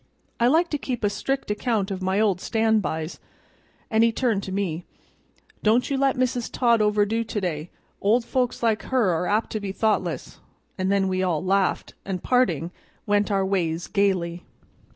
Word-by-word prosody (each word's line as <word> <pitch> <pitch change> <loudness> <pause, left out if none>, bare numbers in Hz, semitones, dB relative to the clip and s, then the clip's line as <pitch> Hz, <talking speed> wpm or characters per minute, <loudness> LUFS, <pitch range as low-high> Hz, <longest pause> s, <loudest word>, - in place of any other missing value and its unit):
"I 235 - +4
like 330 +6 +3
to 295 - -1
keep 250 -4 -4
a 205 - +2
strict 270 0 -2
account 210 -2 -1
of 190 -1 -4
my 190 +2 +1
old 200 -5 +2
stand 220 -1 +2
bys," 160 -2 -4 0.7
and 220 0 +4
he 230 - +4
turned 225 -4 0
to 190 - -6
me. 180 -4 -2 0.8
"Don't 230 +6 +2
you - - +2
let 270 0 +2
Mrs. 250 -2 0
Todd 235 -3 +3
overdo 210 +2 +2
to 220 -1 -3
day, 165 -4 -3 0.3
old 230 +4 +3
folks 250 -2 -1
like 220 -2 +2
her 245 -8 +2
are 170 +1 -1
apt 215 +2 0
to 215 - -2
be 200 -2 -4
thoughtless;" 215 +2 -1 0.4
and 190 0 -1
then 195 -1 +2
we 185 0 0
all 180 -2 0
laughed, 195 0 +1
and, 185 -3 -4
parting, 175 - +1 0.3
went 205 0 +2
our 195 -2 +1
ways 175 -4 -1
gayly. 180 -4 0
205 Hz, 180 wpm, -24 LUFS, 185-230 Hz, 0.8 s, I